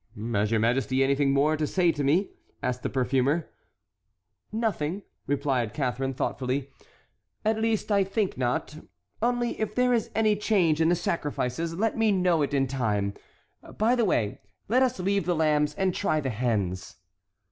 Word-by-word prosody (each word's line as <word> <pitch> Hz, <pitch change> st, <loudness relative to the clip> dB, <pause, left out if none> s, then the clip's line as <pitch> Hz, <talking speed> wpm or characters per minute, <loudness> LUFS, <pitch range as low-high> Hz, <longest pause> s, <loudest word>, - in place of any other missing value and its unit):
"Has 105 Hz, 0 st, +1 dB
your 115 Hz, 0 st, +2 dB
majesty 130 Hz, +3 st, +2 dB
anything 140 Hz, +1 st, +2 dB
more 145 Hz, +3 st, +3 dB
to 155 Hz, 0 st, -1 dB
say 175 Hz, 0 st, +2 dB
to 145 Hz, -2 st, -3 dB
me?" 165 Hz, +9 st, +2 dB, 0.3 s
asked 125 Hz, 0 st, -1 dB
the -, -, -2 dB
perfumer. 135 Hz, +5 st, 0 dB, 1.0 s
"Nothing," 205 Hz, -5 st, -2 dB, 0.2 s
replied 135 Hz, -6 st, 0 dB
Catharine, 135 Hz, -1 st, -1 dB
thoughtfully; 130 Hz, +2 st, -2 dB, 0.7 s
"at 220 Hz, 0 st, +2 dB
least 225 Hz, -1 st, 0 dB
I 200 Hz, -1 st, +4 dB
think 195 Hz, +1 st, -1 dB
not, 125 Hz, +4 st, -2 dB, 0.4 s
only 240 Hz, 0 st, 0 dB
if 215 Hz, -1 st, -2 dB
there 250 Hz, 0 st, +3 dB
is 230 Hz, -3 st, 0 dB
any 215 Hz, -1 st, +3 dB
change 185 Hz, -7 st, +2 dB
in 160 Hz, -, +4 dB
the 175 Hz, -, +4 dB
sacrifices, 165 Hz, -2 st, -2 dB
let 220 Hz, +5 st, 0 dB
me 220 Hz, -1 st, +4 dB
know 180 Hz, -4 st, +2 dB
it 145 Hz, -, 0 dB
in 135 Hz, -1 st, +2 dB
time. 105 Hz, -7 st, -1 dB, 0.6 s
By 225 Hz, +3 st, +3 dB
the 245 Hz, -2 st, +2 dB
way, 105 Hz, -, 0 dB, 0.3 s
let 250 Hz, +5 st, +3 dB
us 255 Hz, -5 st, +1 dB
leave 195 Hz, +1 st, 0 dB
the 175 Hz, -, +2 dB
lambs, 150 Hz, -2 st, +2 dB
and 190 Hz, -1 st, 0 dB
try 155 Hz, -5 st, 0 dB
the 135 Hz, -3 st, -2 dB
hens." 100 Hz, -5 st, -2 dB
150 Hz, 165 wpm, -27 LUFS, 130-200 Hz, 1.0 s, I